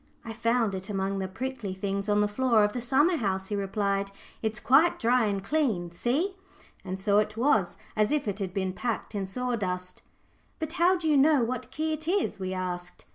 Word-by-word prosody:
"I 225 Hz, -, -5 dB
found 230 Hz, -1 st, +1 dB
it 190 Hz, +2 st, -6 dB
among 195 Hz, -1 st, -1 dB
the 190 Hz, -, -2 dB
prickly 220 Hz, -1 st, -5 dB
things 200 Hz, +1 st, -2 dB
on 205 Hz, 0 st, +3 dB
the 210 Hz, -, +3 dB
floor 230 Hz, 0 st, +3 dB
of 210 Hz, 0 st, +1 dB
the 245 Hz, -, -3 dB
summer 290 Hz, +8 st, +3 dB
house," 190 Hz, -5 st, -2 dB
he 210 Hz, -, -1 dB
replied. 200 Hz, 0 st, -1 dB, 0.3 s
"It's 220 Hz, -1 st, -2 dB
quite 310 Hz, +7 st, +4 dB
dry 240 Hz, 0 st, +3 dB
and 200 Hz, -2 st, -1 dB
clean, 220 Hz, -, 0 dB
see!" 290 Hz, -, -1 dB, 0.5 s
and 185 Hz, +1 st, -5 dB
so 205 Hz, +1 st, +3 dB
it 215 Hz, +1 st, -1 dB
was, 220 Hz, -8 st, +2 dB, 0.2 s
as 215 Hz, +2 st, +2 dB
if 295 Hz, -6 st, 0 dB
it 200 Hz, 0 st, -2 dB
had 190 Hz, -2 st, -3 dB
been 190 Hz, 0 st, -2 dB
packed 230 Hz, +1 st, -3 dB
in 200 Hz, -2 st, -2 dB
sawdust. 190 Hz, -5 st, -3 dB, 0.6 s
"But 315 Hz, -1 st, -3 dB
how 360 Hz, +1 st, +4 dB
do 335 Hz, -2 st, -3 dB
you 300 Hz, -2 st, +4 dB
know 285 Hz, -2 st, +5 dB
what 250 Hz, +1 st, -3 dB
key 315 Hz, +3 st, -2 dB
it 310 Hz, +1 st, -6 dB
is?" 375 Hz, -, 0 dB
we 185 Hz, -1 st, -3 dB
asked. 180 Hz, -1 st, -5 dB
215 Hz, 205 wpm, -28 LUFS, 195-260 Hz, 0.6 s, know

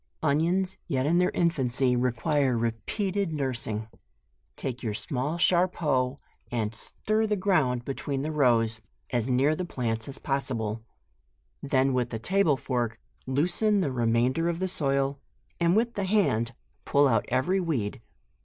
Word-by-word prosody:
ONIONS, 170 Hz, +6 st, +1 dB
yet 135 Hz, -6 st, 0 dB
in 170 Hz, +4 st, +3 dB
their 180 Hz, -, +3 dB
infancy, 130 Hz, -6 st, +1 dB
require 125 Hz, +2 st, +1 dB
repeated 185 Hz, -, -1 dB
nurs 135 Hz, -5 st, -2 dB
ing. 110 Hz, 0 st, -3 dB, 0.7 s
Take 130 Hz, -2 st, -5 dB
your 110 Hz, -4 st, -2 dB
small 135 Hz, +8 st, -2 dB
sharp 180 Hz, +1 st, +3 dB
hoe, 130 Hz, -4 st, 0 dB, 0.3 s
and 115 Hz, -2 st, -1 dB
stir 215 Hz, -, -1 dB
the 210 Hz, -, +1 dB
ground 155 Hz, -11 st, +1 dB
between 135 Hz, 0 st, -3 dB
the 155 Hz, -, -2 dB
rows, 115 Hz, -6 st, +2 dB, 0.3 s
as 120 Hz, 0 st, 0 dB
near 135 Hz, +5 st, +3 dB
the 180 Hz, -, -3 dB
plants 115 Hz, -8 st, -3 dB
as 135 Hz, -, -5 dB
possible. 115 Hz, -6 st, -2 dB, 0.8 s
Then 135 Hz, -1 st, +2 dB
with 125 Hz, -1 st, 0 dB
a 115 Hz, -, -2 dB
table 165 Hz, -, +2 dB
fork, 120 Hz, -4 st, -2 dB, 0.3 s
loosen 180 Hz, +10 st, +2 dB
the 145 Hz, -7 st, 0 dB
remainder 125 Hz, +6 st, +1 dB
of 170 Hz, -, -1 dB
the 185 Hz, +2 st, -1 dB
soil, 140 Hz, -5 st, 0 dB, 0.4 s
and 170 Hz, +1 st, +3 dB
with 235 Hz, +2 st, +2 dB
the 200 Hz, -, -2 dB
hand 130 Hz, -, +1 dB, 0.3 s
pull 145 Hz, 0 st, +4 dB
out 115 Hz, -5 st, +2 dB
every 130 Hz, +10 st, +1 dB
weed. 130 Hz, -, -2 dB
135 Hz, 150 wpm, -27 LUFS, 120-170 Hz, 0.8 s, pull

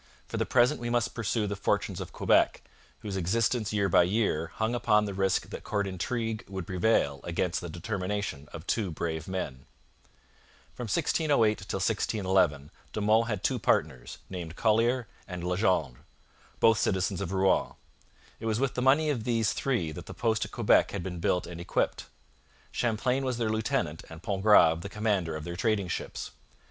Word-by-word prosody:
For -, -, -4 dB
the -, -, 0 dB
present 125 Hz, +4 st, +3 dB
we 120 Hz, -, -2 dB
must 120 Hz, -2 st, 0 dB
pursue 115 Hz, -1 st, -1 dB
the 100 Hz, 0 st, -2 dB
fortunes 100 Hz, -, -1 dB
of -, -, -7 dB
Quebec, -, -, +2 dB, 0.4 s
whose 100 Hz, -2 st, -5 dB
existence 110 Hz, +4 st, 0 dB
year 100 Hz, -2 st, +1 dB
by 90 Hz, -2 st, +5 dB
year 90 Hz, -4 st, +1 dB
hung 110 Hz, +2 st, 0 dB
upon 105 Hz, -3 st, +3 dB
the 100 Hz, -, -4 dB
risk 95 Hz, 0 st, 0 dB
that -, -, -7 dB
court 100 Hz, -1 st, -1 dB
intrigue 110 Hz, +4 st, -3 dB
would 95 Hz, -2 st, -5 dB
prevail 90 Hz, -7 st, +1 dB
against 85 Hz, +1 st, -1 dB
the 85 Hz, -, -6 dB
determination 90 Hz, -4 st, -4 dB
of 80 Hz, -, -8 dB
two 105 Hz, -3 st, 0 dB
brave 80 Hz, 0 st, -3 dB
men. 75 Hz, -9 st, -4 dB, 1.1 s
From 125 Hz, -, -6 dB
1608 115 Hz, -, +2 dB
till -, -, -2 dB
1611 95 Hz, -8 st, +1 dB, 0.2 s
De -, -, -2 dB
Monts 110 Hz, +2 st, +3 dB
had 105 Hz, -4 st, -3 dB
two 130 Hz, -2 st, +1 dB
partners, 65 Hz, -, 0 dB
named 85 Hz, -3 st, -6 dB
Collier 115 Hz, +3 st, +2 dB, 0.2 s
and 90 Hz, -2 st, -6 dB
Legendre, 90 Hz, -, +1 dB, 0.6 s
both 115 Hz, -1 st, +5 dB
citizens 95 Hz, -1 st, 0 dB
of 95 Hz, -2 st, -3 dB
Rouen. 95 Hz, 0 st, +2 dB, 0.7 s
It 115 Hz, -, -4 dB
was 110 Hz, 0 st, 0 dB
with 135 Hz, -1 st, 0 dB
the 125 Hz, -, -2 dB
money 145 Hz, +4 st, +4 dB
of 120 Hz, -6 st, -2 dB
these 115 Hz, -2 st, +1 dB
three 120 Hz, -13 st, -1 dB
that -, -, -9 dB
the -, -, -8 dB
post 110 Hz, -2 st, +1 dB
at -, -, -11 dB
Quebec -, -, +3 dB
had 100 Hz, -3 st, -4 dB
been 90 Hz, -2 st, -5 dB
built 90 Hz, +2 st, +1 dB
and 85 Hz, -1 st, -8 dB
equipped. -, -, -1 dB, 0.6 s
Champlain 125 Hz, +3 st, 0 dB
was 130 Hz, -2 st, -1 dB
their 115 Hz, -2 st, 0 dB
lieutenant 110 Hz, -, -1 dB
and 80 Hz, +1 st, -11 dB
Pontgrave 95 Hz, -5 st, +4 dB
the 100 Hz, -, -6 dB
commander 100 Hz, -6 st, 0 dB
of 80 Hz, -, -5 dB
their 85 Hz, +1 st, -5 dB
trading 100 Hz, -1 st, 0 dB
ships. -, -, -4 dB
100 Hz, 175 wpm, -29 LUFS, 90-115 Hz, 1.1 s, by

